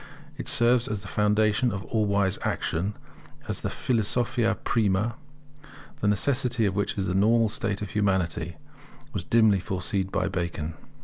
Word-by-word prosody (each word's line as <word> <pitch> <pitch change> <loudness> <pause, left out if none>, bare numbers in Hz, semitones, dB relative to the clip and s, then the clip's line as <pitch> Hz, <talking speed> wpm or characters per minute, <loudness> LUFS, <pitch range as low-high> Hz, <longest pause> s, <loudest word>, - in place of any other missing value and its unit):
It - - -7
serves 120 +1 +3
as 105 -5 -3
the - - -8
foundation 105 +4 +2
of 100 0 -5
all 110 -2 0
wise 100 -1 +1
action; 95 +6 -2 0.5
as - - -1
the - - -2
philosophia 120 0 0
prima, 105 0 +1 0.9
the 105 - 0
necessity 120 +2 +2
of 95 -2 0
which 100 0 -1
in 95 - 0
the 90 - -1
normal 110 +3 +3
state 105 -1 -2
of 100 - -6
humanity 85 -5 0 0.6
was - - -3
dimly 110 -4 +4
foreseen 95 +1 -2
by 95 -1 -1
Bacon. 85 -4 -3
105 Hz, 150 wpm, -26 LUFS, 95-115 Hz, 0.9 s, dimly